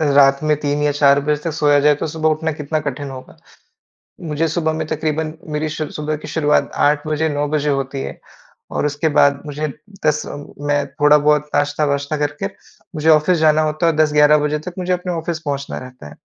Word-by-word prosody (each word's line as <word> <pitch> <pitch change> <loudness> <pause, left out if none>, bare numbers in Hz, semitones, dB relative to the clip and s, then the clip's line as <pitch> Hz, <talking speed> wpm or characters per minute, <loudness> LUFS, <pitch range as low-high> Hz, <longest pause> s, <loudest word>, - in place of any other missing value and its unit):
रात 140 -1 +6
में 155 0 +2
3 145 0 -1
या 150 - +2
4 140 -1 +4
बजे 150 +1 +1
तक 165 - -2
सोया 145 -2 +3
जाए, 150 +1 +4
तो 145 - -3
सुबह 160 0 0
उठना 160 +1 -1
कितना 150 +1 -3
कठिन 140 -1 -5
होगा। 130 -1 -11 0.9
मुझे 150 +2 0
सुबह 160 0 -1
में 160 0 -3
तकरीबन 155 0 -2 0.2
मेरी 155 +1 -1
शु 155 0 -4
सुबह 150 0 -3
की 155 - -10
शुरुआत 150 -2 +1
8 145 +1 +2
बजे, 155 +1 0
9 145 0 -1
बजे 150 0 0
होती 135 -1 -2
है। - - -7 0.5
और - - -1
उसके 150 +2 0
बाद 140 -1 +3
मुझे 150 +1 -3 0.4
10 155 0 +1
अ, - - -6 0.3
मैं 145 -1 0
थोड़ा 150 +2 +4
बहुत 150 0 +2
नाश्ता-वाश्ता 145 0 0
करके 150 +7 -2 0.5
मुझे 155 +1 +1
ऑफिस 155 +3 +4
जाना 155 0 +4
होता 155 +2 0
और 165 - +3
10, 155 -1 +3
11 150 0 +6
बजे 150 0 -1
तक - - -14
मुझे 180 0 -1
अपने 180 0 -2
ऑफिस 165 -1 -3
पहुँचना 140 -1 -3
रहता 130 -9 -11
है। 75 - -12
150 Hz, 205 wpm, -19 LUFS, 145-155 Hz, 0.9 s, रात